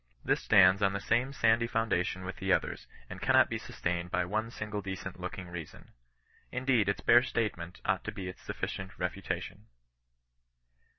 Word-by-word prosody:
This - - +2
stands 95 0 +6
on 95 -1 +3
the 100 - -1
same 120 +6 +1
sandy 115 -3 +3
foundation 100 -6 0
with 95 0 -6
the 95 +1 -1
others, - - 0 0.2
and - - -9
cannot - - +4
be - - -1
sustained 85 0 -3
by 90 0 0
one 110 +5 -1
single 105 -2 -4
decent 95 -1 -6
looking 95 -2 -6
reason. 85 -3 -9 0.6
Indeed, 125 -5 +2
its 100 - -1
bare 120 - +7
statement 105 -8 -3
ought - - +1
to - - -2
be 95 -2 -6
its 90 - -8
sufficient 95 -1 -5
refutation. 95 +2 -4
95 Hz, 165 wpm, -31 LUFS, 90-115 Hz, 0.6 s, bare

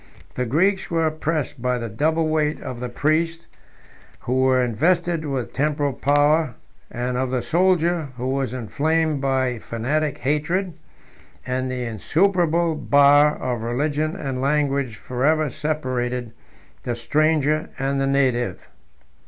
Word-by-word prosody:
The 125 -1 -2
Greeks 190 - +1
were 165 -1 +1
oppressed 155 -4 -2
by 125 0 0
the 115 -1 -4
double 155 +9 0
weight 155 -1 0
of 125 -2 -7
the 125 0 -4
priests, 165 +5 0 0.8
who 130 +2 0
were 130 0 +3
invested 165 +7 +1
with 135 -4 -3
temporal 145 -1 0
power, 145 +1 +2 0.3
and 125 +1 -3
of 130 0 -1
the 125 -1 -1
soldier, 175 -2 +2
who 125 +1 -3
was 135 -3 -1
inflamed 150 +5 0
by 130 -3 0
fanatic 140 +7 -2
hatred; 155 +7 -1 0.7
and 130 0 -2
the 125 -1 -3
insuperable 170 - +1
bar 145 0 +5
of 125 -3 -3
religion 145 +7 -1
and 135 -8 -4
language 140 -3 0
forever 140 +6 0
separated 125 -6 -2 0.5
the 120 - -3
stranger 155 +4 +1
and 135 +1 -1
the 135 - +1
native. 130 -3 0
145 Hz, 130 wpm, -22 LUFS, 125-155 Hz, 0.8 s, bar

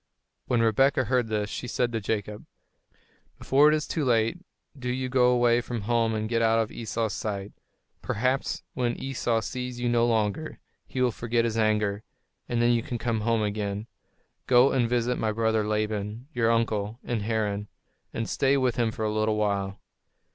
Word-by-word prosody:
When 120 -2 +2
Rebekah 130 +4 +3
heard 125 -1 +1
this, 105 -1 -1
she 125 - -5
said 120 0 0
to 115 -2 -2
Jacob, 105 0 -3 0.9
"Before 140 +3 +4
it 155 - +4
is 150 - -2
too 160 - -1
late, 115 +5 +2 0.4
do 125 -3 -5
you 130 +1 -2
go 125 -1 +4
away 120 -1 +3
from 120 -2 -4
home 115 +1 +1
and 110 0 -2
get 115 0 0
out 115 0 +3
of 110 -1 0
Esau's 115 -1 -2
sight. 100 -2 -4 0.5
Perhaps 130 +5 -1
when 120 -2 -1
Esau 120 -4 -1
sees 125 +1 -5
you 120 - -1
no 120 0 +3
longer, 110 +6 -1 0.3
he 130 - -3
will 125 -1 +3
forget 115 +1 0
his 115 -1 -1
anger, 105 -2 +1 0.5
and 120 - 0
then 120 - +4
you 120 -1 +2
can 120 - -4
come 115 -1 -1
home 115 0 +1
again. 105 0 -2 0.6
Go 125 +1 +6
and 120 -3 +1
visit 120 0 0
my 110 - 0
brother 110 -1 +1
Laban, 105 +2 -2
your 115 -3 +2
uncle, 110 -2 0
in 120 -2 -2
Haran, 105 -1 -1 0.4
and 115 - -3
stay 135 +1 +2
with 130 -3 +1
him 120 -2 +2
for 110 - -3
a 105 - 0
little 110 0 +1
while." 100 -2 -1
115 Hz, 185 wpm, -27 LUFS, 110-125 Hz, 0.9 s, Go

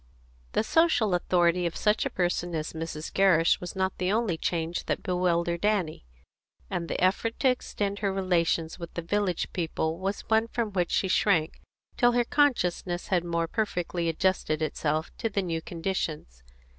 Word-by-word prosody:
The - - +2
social 245 - +3
authority 175 0 +2
of 165 - -5
such 210 0 +2
a - - -4
person 175 -1 -1
as 155 0 -3
Mrs. 160 -1 -5
Gerrish 180 -4 +4
was 180 +1 -6
not 190 0 0
the 185 +1 +1
only 220 -5 +1
change 165 +1 -2
that - - -2
bewildered 170 -1 0
Annie, 190 - 0 0.6
and 170 - -2
the - - -2
effort 195 +5 +1
to 265 - +5
extend 205 -5 -2
her 200 -2 0
relations 175 -3 0
with 170 -1 -7
the 170 - -3
village 190 0 -1
people 165 -1 -2
was 195 +2 -2
one 220 +1 +2
from 230 -2 -2
which 180 -3 0
she 190 - +1
shrank 180 -4 +2 0.4
till 245 -1 +4
her 240 0 +2
consciousness 180 - +1
had 180 -3 +2
more 170 -1 -1
perfectly 175 -4 -1
adjusted 165 -2 0
itself 155 +1 -2
to 225 - 0
the 200 -2 -1
new 165 -2 -2
conditions. 165 - -4
180 Hz, 170 wpm, -27 LUFS, 165-200 Hz, 0.6 s, to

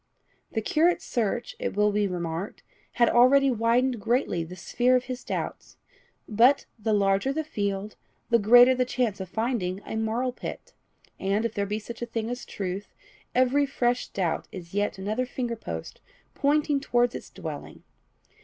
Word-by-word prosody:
The 220 - -1
curate's 335 +9 +2
search, 235 0 -2
it - - -3
will 210 0 +4
be 205 0 +1
remarked, 175 +1 -4 0.3
had 235 - +4
already 265 +3 +5
widened 235 +1 +1
greatly 225 -6 0
the 170 +3 -9
sphere 245 +7 +1
of 250 - +2
his 250 0 -6
doubts; - - -5 0.5
but, 240 +6 +4
the 220 +1 -1
larger 200 +4 +2
the 315 +3 -2
field, 200 -6 -3 0.3
the 235 - +5
greater 245 +4 +7
the 255 0 +1
chance 245 -5 -1
of 190 -2 -6
finding 220 -4 -1
a - - -5
marl 225 +3 0
pit; - - -8 0.5
and, 200 +4 0
if 230 - -2
there 200 0 -1
be 210 +1 -2
such 230 +2 -8
a 240 - -3
thing 225 0 -3
as 245 +1 -5
truth, 195 +1 -5 0.4
every 260 +3 +3
fresh 245 -2 0
doubt 175 -4 -2
is 175 -2 -9
yet 205 0 0
another 215 +6 -2
finger 245 -2 -3
post 80 - -7 0.3
pointing 290 0 +2
towards 245 -3 +1
its - - -7
dwelling. - - -8
230 Hz, 165 wpm, -26 LUFS, 200-250 Hz, 0.5 s, greater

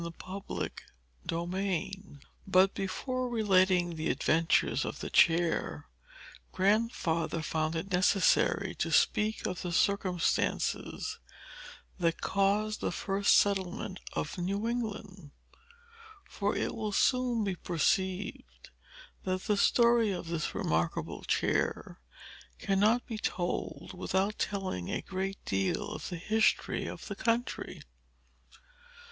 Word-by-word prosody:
Chapter 185 +3 -5 0.6
II 185 +2 -2 0.5
But, 190 +1 +5
before 255 +6 -2
relating 185 -6 +3
the 155 - -1
adventures 165 +1 +2
of - - -5
the - - -5
chair, 170 0 +2 0.6
Grandfather 185 -6 +1
found 155 +1 -1
it 165 +4 -4
necessary 185 +2 +3
to - - 0
speak 215 +1 +2
of 180 - -3
the 180 - -3
circumstances 185 -1 0 0.8
that 165 -2 +1
caused 205 +2 +1
the - - -1
first 200 0 +2
settlement 190 0 +1
of - - -3
New 200 +5 -1
England. 210 -8 -4 1.0
For 205 0 -1
it - - -1
will 215 -2 -3
soon 250 -1 +2
be 195 -2 -1
perceived 185 +3 -2 0.5
that 185 0 -2
the 210 - +1
story 235 +1 +4
of 180 -3 -5
this 165 -2 -2
remarkable 80 +1 -1
chair - - 0 0.6
cannot 210 +5 +2
be 225 -3 -5
told 180 -4 -3
without 190 +3 -1
telling 190 - -2
a - - -2
great 195 +1 -3
deal 100 - -1
of - - -6
the 175 - -4
history 220 +6 +1
of - - -7
the 205 - -5
country. 230 +4 -2
195 Hz, 110 wpm, -31 LUFS, 175-210 Hz, 1.0 s, But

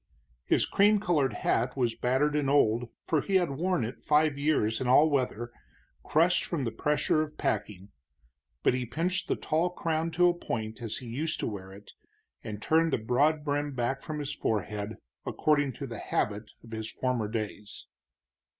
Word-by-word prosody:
His - - +3
cream 205 +1 +4
colored 150 - +1
hat 120 +5 0
was 120 -3 +1
battered 130 +5 +1
and 145 -2 +1
old, 120 -4 +3
for 155 -3 +1
he 195 - -1
had 175 -5 +3
worn 170 -1 0
it 120 - -8
five 150 -1 +3
years 140 -7 +1
in 130 - -1
all 145 +5 +6
weather, 120 -4 -1 0.5
crushed 170 +3 +3
from 160 -6 -2
the 115 - -1
pressure 150 +5 +1
of 155 -1 -5
packing, 100 -1 -2 0.7
but - - +4
he 125 0 -1
pinched 170 +10 -2
the - - +1
tall 165 +3 0
crown 165 -2 -1
to 175 +2 +5
a 175 - +4
point 110 -8 -4
as 115 -3 -3
he 130 - -9
used 145 +8 -2
to - - -1
wear 95 -3 -6
it, 100 +1 -13 0.5
and 105 -1 -6
turned 165 +1 +3
the - - +2
broad 145 +7 +1
brim 145 -1 -1
back 125 +2 -1
from 155 - -5
his 145 -1 -3
forehead 105 -3 -2 0.3
according 145 -3 +1
to 140 - -6
the 115 -4 -7
habit 105 +1 -2
of 115 - -14
his 110 0 -5
former 125 -4 -1
days. 105 -2 -5
135 Hz, 180 wpm, -29 LUFS, 115-155 Hz, 0.7 s, all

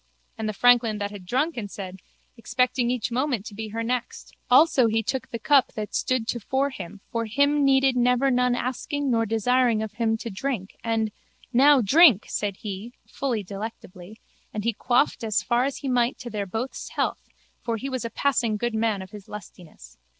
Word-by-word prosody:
And 220 -1 -3
the - - -3
franklin 235 -1 +4
that 205 0 -3
had 195 -3 -10
drunken 255 - -1
said, 190 -2 -8 0.4
Expecting 250 +1 0
each 245 -2 -1
moment 250 -4 -1
to 220 - -8
be 220 +2 -5
her 225 +2 -4
next. 245 +1 -4 0.2
Also 260 -1 +5
he 225 0 +1
took 260 +3 -3
the 230 - -4
cup 275 +3 +3
that 210 -1 -5
stood 255 -3 0
tofore 265 +5 -1
him 195 -4 -9
for 230 -1 -1
him 285 +5 +2
needed 270 -1 +4
never 250 +2 +3
none 250 0 +2
asking 265 +3 -2
nor 225 -1 +1
desiring 225 +1 +2
of 220 - -5
him 225 0 0
to 230 0 -6
drink 195 -1 -4
and, 225 -2 0 0.4
Now 275 +2 +6
drink, 265 - +6
said 200 -2 -2
he, 210 +3 -6
fully 245 -6 -2
delectably, 200 0 -8 0.3
and 210 - -4
he 235 +1 +1
quaffed 245 +4 +1
as 215 -2 0
far 240 +1 +2
as 275 - -3
he 275 - -6
might 245 -1 +1
to 240 -1 -8
their 205 -2 -3
both's 225 +7 -4
health - - -2 0.4
for 230 -1 -1
he 265 - -5
was 255 -3 -3
a 230 - -3
passing 235 -3 0
good 240 +2 -2
man 220 -3 0
of 190 - -13
his 205 -3 -11
lustiness. 165 - -12
230 Hz, 190 wpm, -25 LUFS, 215-255 Hz, 0.4 s, Now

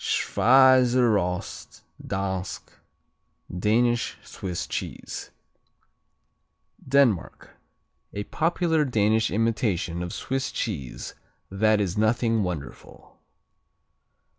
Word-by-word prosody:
Schweizerost 125 -7 +2 0.2
Dansk, 95 -1 -4 0.8
Danish 120 +5 +1
Swiss 90 -3 -5
Cheese - - -6 1.6
Denmark 130 -9 +1 0.6
A 100 - -4
popular 160 - 0
Danish 110 -4 +1
imitation 105 -6 -1
of 90 0 -4
Swiss 135 0 -3
Swiss - - -5
cheese 75 - -4 0.4
that 110 +2 +2
is 100 -1 -1
nothing 115 0 +2
wonderful. 85 -8 -7
110 Hz, 75 wpm, -25 LUFS, 95-125 Hz, 1.6 s, Schweizerost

